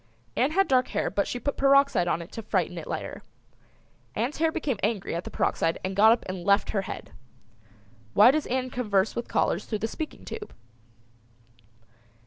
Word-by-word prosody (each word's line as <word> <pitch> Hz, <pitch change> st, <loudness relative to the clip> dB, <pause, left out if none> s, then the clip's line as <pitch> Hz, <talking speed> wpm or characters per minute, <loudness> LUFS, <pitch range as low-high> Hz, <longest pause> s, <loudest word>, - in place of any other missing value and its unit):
Ann 260 Hz, -, +2 dB
had 390 Hz, +2 st, +3 dB
dark 255 Hz, -1 st, +3 dB
hair -, -, -1 dB
but 200 Hz, -, 0 dB
she 245 Hz, -, -3 dB
put 285 Hz, +4 st, -3 dB
peroxide 275 Hz, -8 st, +4 dB
on 170 Hz, 0 st, 0 dB
it 170 Hz, -, -15 dB
to 225 Hz, -, -6 dB
frighten 220 Hz, -, -1 dB
it -, -, -9 dB
lighter. -, -, -5 dB, 0.9 s
Ann's 245 Hz, +6 st, -1 dB
hair 320 Hz, 0 st, +2 dB
became 295 Hz, -9 st, -2 dB
angry 210 Hz, -2 st, -1 dB
at 170 Hz, +1 st, -3 dB
the -, -, -5 dB
peroxide 165 Hz, 0 st, 0 dB
and 190 Hz, +1 st, -3 dB
got 215 Hz, +3 st, +7 dB
up 235 Hz, -, +1 dB
and 185 Hz, -1 st, -5 dB
left 200 Hz, +2 st, +3 dB
her 200 Hz, -, 0 dB
head. -, -, -7 dB, 1.0 s
Why 215 Hz, +5 st, +8 dB
does 305 Hz, +1 st, -1 dB
Ann 255 Hz, 0 st, -1 dB
converse 210 Hz, -5 st, 0 dB
with 235 Hz, -, -3 dB
callers -, -, 0 dB
through 215 Hz, -, -2 dB
the 220 Hz, +2 st, -2 dB
speaking 310 Hz, +6 st, -7 dB
tube? 425 Hz, -1 st, -8 dB
235 Hz, 185 wpm, -27 LUFS, 200-275 Hz, 1.0 s, Why